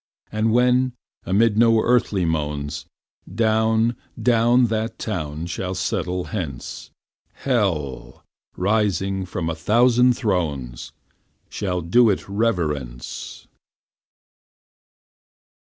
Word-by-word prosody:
And 110 Hz, +1 st, +1 dB
when, 125 Hz, +1 st, +3 dB, 0.3 s
amid 105 Hz, +3 st, +3 dB
no 115 Hz, -1 st, +5 dB
earthly 110 Hz, -6 st, +2 dB
moans, 75 Hz, -2 st, -3 dB, 0.4 s
Down, 110 Hz, +2 st, +2 dB, 0.2 s
down 120 Hz, +1 st, +4 dB
that 110 Hz, 0 st, -2 dB
town 80 Hz, -6 st, -4 dB
shall 90 Hz, +2 st, -4 dB
settle 90 Hz, 0 st, -2 dB
hence, 80 Hz, -, -5 dB, 0.4 s
Hell, 75 Hz, -, -2 dB, 0.3 s
rising 95 Hz, -1 st, 0 dB
from 90 Hz, -2 st, -3 dB
a 80 Hz, -, -1 dB
thousand 120 Hz, +9 st, +4 dB
thrones, 75 Hz, -, -2 dB, 0.6 s
Shall 90 Hz, -3 st, -2 dB
do 110 Hz, +8 st, +4 dB
it 100 Hz, -, -1 dB
reverence. 80 Hz, -, -3 dB
100 Hz, 90 wpm, -22 LUFS, 80-115 Hz, 0.6 s, no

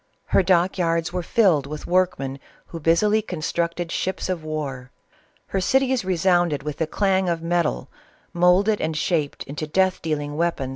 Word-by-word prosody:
Her -, -, +3 dB
dock 185 Hz, 0 st, +2 dB
yards 165 Hz, 0 st, 0 dB
were 180 Hz, -, -1 dB
filled 170 Hz, -, +2 dB
with 150 Hz, +1 st, -7 dB
workmen 175 Hz, -7 st, 0 dB, 0.3 s
who 165 Hz, -, -8 dB
busily 205 Hz, +7 st, +3 dB
constructed 170 Hz, -2 st, -3 dB
ships 190 Hz, 0 st, -2 dB
of 175 Hz, -4 st, -2 dB
war; 140 Hz, -5 st, -5 dB, 0.6 s
her 190 Hz, -, -1 dB
cities 265 Hz, +2 st, +2 dB
resounded, 175 Hz, -4 st, +1 dB
with 150 Hz, -1 st, -5 dB
the 160 Hz, -, -1 dB
clang 190 Hz, +1 st, +1 dB
of 165 Hz, -1 st, -2 dB
metal, 170 Hz, -, 0 dB, 0.5 s
moulded 180 Hz, +5 st, +3 dB
and 155 Hz, 0 st, -2 dB
shaped 155 Hz, -3 st, -1 dB
into 150 Hz, +2 st, -6 dB
death 185 Hz, +4 st, +1 dB
dealing 145 Hz, -2 st, -3 dB
weapon? 165 Hz, -6 st, -1 dB
170 Hz, 155 wpm, -23 LUFS, 155-185 Hz, 0.6 s, Her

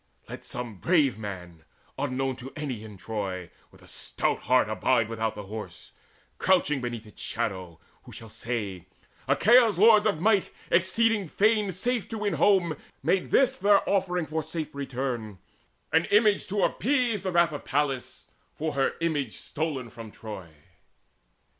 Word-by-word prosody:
Let -, -, -8 dB
some 120 Hz, -4 st, -6 dB
brave 150 Hz, -10 st, +2 dB
man, 90 Hz, -6 st, -8 dB, 0.3 s
unknown 135 Hz, -1 st, -1 dB
of 130 Hz, -, -7 dB
any 135 Hz, -8 st, -4 dB
in 105 Hz, -2 st, -10 dB
Troy, 95 Hz, -4 st, -5 dB, 0.2 s
With -, -, -20 dB
a -, -, -16 dB
stout -, -, -2 dB
heart -, -, +4 dB
abide 115 Hz, -, +1 dB
without 110 Hz, -1 st, -2 dB
the 105 Hz, -, -7 dB
Horse, 100 Hz, -3 st, -8 dB, 0.5 s
Crouching 170 Hz, -7 st, +2 dB
beneath 120 Hz, -2 st, -4 dB
its 105 Hz, -, -13 dB
shadow, 95 Hz, -7 st, -4 dB, 0.2 s
who -, -, -14 dB
shall 115 Hz, -, -9 dB
say: 105 Hz, -6 st, -5 dB, 0.4 s
"`Achaea's 230 Hz, -3 st, +5 dB
lords 215 Hz, +1 st, +6 dB
of 200 Hz, -7 st, 0 dB
might, 200 Hz, +1 st, +3 dB, 0.2 s
exceeding 200 Hz, +3 st, +2 dB
fain 210 Hz, +3 st, +2 dB
Safe 230 Hz, +3 st, -2 dB
to 225 Hz, -, -4 dB
win 210 Hz, -1 st, -1 dB
home, 185 Hz, -6 st, +3 dB, 0.3 s
made 180 Hz, +5 st, +1 dB
this 265 Hz, 0 st, +3 dB
their 200 Hz, 0 st, +4 dB
offering 180 Hz, -3 st, +1 dB
For 160 Hz, +1 st, -2 dB
safe 155 Hz, 0 st, -5 dB
return, 125 Hz, -6 st, -4 dB, 0.6 s
an 160 Hz, +1 st, +4 dB
image 210 Hz, 0 st, +3 dB
to 205 Hz, 0 st, 0 dB
appease 245 Hz, -5 st, +1 dB
The 190 Hz, 0 st, -2 dB
wrath 170 Hz, -1 st, +4 dB
of 145 Hz, -, -6 dB
Pallas 140 Hz, -3 st, -2 dB, 0.3 s
for 155 Hz, 0 st, -2 dB
her 135 Hz, -1 st, +1 dB
image 145 Hz, -8 st, -1 dB
stolen 145 Hz, -6 st, -4 dB
From 115 Hz, -2 st, -9 dB
Troy.' 105 Hz, -5 st, -9 dB
150 Hz, 155 wpm, -27 LUFS, -, 0.6 s, lords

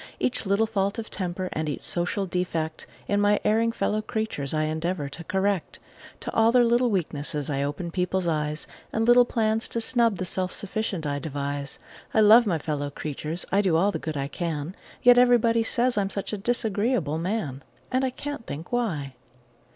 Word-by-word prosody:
Each 250 Hz, -4 st, 0 dB
little 200 Hz, +3 st, +3 dB
fault 200 Hz, -1 st, -1 dB
of 225 Hz, -1 st, -6 dB
temper 185 Hz, 0 st, -3 dB
and 155 Hz, 0 st, -2 dB
each 145 Hz, -, -4 dB
social 180 Hz, +3 st, -1 dB
defect 170 Hz, -3 st, -3 dB, 0.2 s
In 205 Hz, 0 st, +1 dB
my 205 Hz, 0 st, +3 dB
erring 225 Hz, +2 st, +2 dB
fellow 215 Hz, -2 st, -1 dB
creatures, 215 Hz, -, -2 dB
I 155 Hz, 0 st, +1 dB
endeavor 160 Hz, -1 st, -2 dB
to 170 Hz, +4 st, -8 dB
correct. 190 Hz, -1 st, -1 dB, 0.4 s
To -, -, -5 dB
all 225 Hz, 0 st, +4 dB
their 245 Hz, 0 st, +5 dB
little 240 Hz, +1 st, +3 dB
weaknesses 150 Hz, -, -2 dB
I 140 Hz, -1 st, -1 dB
open 145 Hz, +5 st, -3 dB
people's 180 Hz, +1 st, -1 dB
eyes 150 Hz, -2 st, -1 dB, 0.3 s
And 225 Hz, 0 st, 0 dB
little 245 Hz, 0 st, +7 dB
plans 220 Hz, -1 st, +1 dB
to 230 Hz, -, -1 dB
snub 230 Hz, -2 st, +3 dB
the 185 Hz, -, -3 dB
self 185 Hz, +1 st, -1 dB
sufficient 200 Hz, -4 st, -3 dB
I 145 Hz, -1 st, -1 dB
devise; 140 Hz, -2 st, -4 dB, 0.4 s
I -, -, +5 dB
love 220 Hz, +2 st, +7 dB
my 175 Hz, -5 st, +1 dB
fellow 145 Hz, -2 st, -3 dB
creatures 155 Hz, +3 st, -3 dB
I 200 Hz, -, +4 dB
do 180 Hz, -5 st, +2 dB
all 195 Hz, +5 st, +3 dB
the -, -, -3 dB
good 155 Hz, -2 st, -4 dB
I 140 Hz, 0 st, -2 dB
can 165 Hz, +2 st, -4 dB, 0.3 s
Yet 245 Hz, 0 st, +8 dB
everybody 235 Hz, -2 st, +4 dB
say 240 Hz, +2 st, +2 dB
I'm 200 Hz, -2 st, 0 dB
such 200 Hz, +1 st, -3 dB
a -, -, -1 dB
disagreeable 215 Hz, -, 0 dB
man! 170 Hz, -, -2 dB, 0.3 s
And 260 Hz, 0 st, +1 dB
I 260 Hz, -, +2 dB
can't 285 Hz, -1 st, -6 dB
think 150 Hz, +4 st, -7 dB
why! 170 Hz, -, -1 dB
190 Hz, 190 wpm, -26 LUFS, 155-225 Hz, 0.4 s, Yet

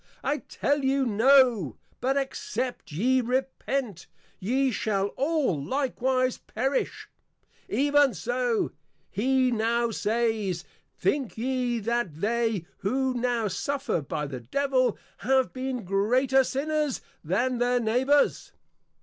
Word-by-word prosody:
I -, -, 0 dB
tell 285 Hz, 0 st, -1 dB
you 270 Hz, 0 st, +2 dB
No, 235 Hz, -, +4 dB, 0.2 s
But 265 Hz, +3 st, +1 dB
except 270 Hz, -, -3 dB
ye 250 Hz, -, +2 dB
Repent, 255 Hz, -4 st, -2 dB, 0.3 s
ye 260 Hz, +7 st, +1 dB
shall 200 Hz, -3 st, 0 dB
all 275 Hz, -, 0 dB
likewise 255 Hz, -, 0 dB
Perish:_ 265 Hz, +4 st, -2 dB, 0.7 s
Even 285 Hz, -3 st, +3 dB
so, 245 Hz, +4 st, 0 dB, 0.4 s
he 255 Hz, +4 st, +2 dB
now 235 Hz, +1 st, +1 dB
says, 215 Hz, -5 st, -1 dB, 0.3 s
_Think 275 Hz, -7 st, 0 dB
ye 250 Hz, 0 st, 0 dB
that 235 Hz, -6 st, -1 dB
they 220 Hz, 0 st, 0 dB
who 260 Hz, +5 st, 0 dB
now 240 Hz, -2 st, 0 dB
suffer 270 Hz, -, -1 dB
by 150 Hz, +1 st, -3 dB
the 135 Hz, -3 st, -6 dB
Devil, 255 Hz, -, +1 dB, 0.2 s
have 265 Hz, +2 st, +1 dB
been 255 Hz, -2 st, -3 dB
greater 250 Hz, +8 st, +3 dB
Sinners 295 Hz, +1 st, -1 dB, 0.2 s
than 240 Hz, +10 st, 0 dB
their 245 Hz, 0 st, +2 dB
Neighbours? 255 Hz, +6 st, +2 dB
250 Hz, 110 wpm, -27 LUFS, 220-265 Hz, 0.7 s, No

